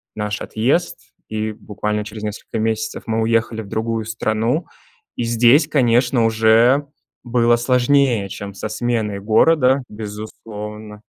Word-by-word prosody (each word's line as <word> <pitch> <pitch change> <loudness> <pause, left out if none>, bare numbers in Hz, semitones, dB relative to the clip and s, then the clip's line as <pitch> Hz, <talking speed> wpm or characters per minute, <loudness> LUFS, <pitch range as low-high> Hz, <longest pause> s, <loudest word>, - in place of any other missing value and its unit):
наш 105 -1 -3
отъезд, 140 +11 0 0.3
и 110 0 -3
буквально 105 0 -4
через 110 0 -8
несколько 105 +1 -5
месяцев 110 0 -2
мы 110 0 -1
уехали 115 0 0
в 105 - -10
другую 110 +1 -2
страну, 115 +6 -1 0.5
и 120 - -2
здесь, 120 +6 +4
конечно, 125 -4 +2
уже 115 +5 +4 0.4
было 120 -1 +2
сложнее, 125 -3 +2
чем 100 +1 -7
со 105 +2 -5
сменой 110 -3 -2
города, 130 +5 +3
безусловно. 105 0 -8
110 Hz, 125 wpm, -20 LUFS, 110-120 Hz, 0.5 s, здесь